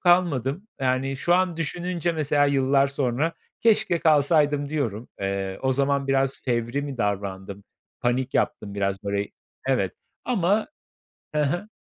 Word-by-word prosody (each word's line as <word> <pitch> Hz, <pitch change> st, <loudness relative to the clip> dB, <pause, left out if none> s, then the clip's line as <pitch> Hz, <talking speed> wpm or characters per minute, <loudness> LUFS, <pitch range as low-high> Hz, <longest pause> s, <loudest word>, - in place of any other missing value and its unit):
kalmadım. 175 Hz, -, +2 dB
Yani 130 Hz, +1 st, 0 dB
şu 175 Hz, +6 st, +2 dB
an 180 Hz, -2 st, +2 dB
düşününce 175 Hz, +1 st, -2 dB
mesela 145 Hz, -2 st, +2 dB
yıllar 135 Hz, 0 st, +3 dB
sonra: 140 Hz, +3 st, 0 dB, 0.3 s
"Keşke 215 Hz, -6 st, +3 dB
kalsaydım." 145 Hz, -2 st, +3 dB
diyorum. 125 Hz, -7 st, -2 dB
Eee, 95 Hz, -1 st, -2 dB
o 130 Hz, 0 st, +2 dB
zaman 140 Hz, +1 st, +1 dB
biraz 135 Hz, 0 st, +1 dB
fevri 120 Hz, +2 st, -1 dB
mi 140 Hz, -2 st, -5 dB
davrandım? 100 Hz, -1 st, -3 dB, 0.4 s
Panik 125 Hz, +2 st, 0 dB
yaptım 100 Hz, -1 st, -1 dB
biraz 100 Hz, -1 st, -1 dB
böyle, 100 Hz, 0 st, -1 dB, 0.4 s
evet, -, -, +1 dB, 0.3 s
ama 210 Hz, -2 st, +1 dB, 0.7 s
Hı 150 Hz, -, +3 dB
hı. 175 Hz, +9 st, -1 dB
140 Hz, 130 wpm, -25 LUFS, 120-165 Hz, 0.7 s, yıllar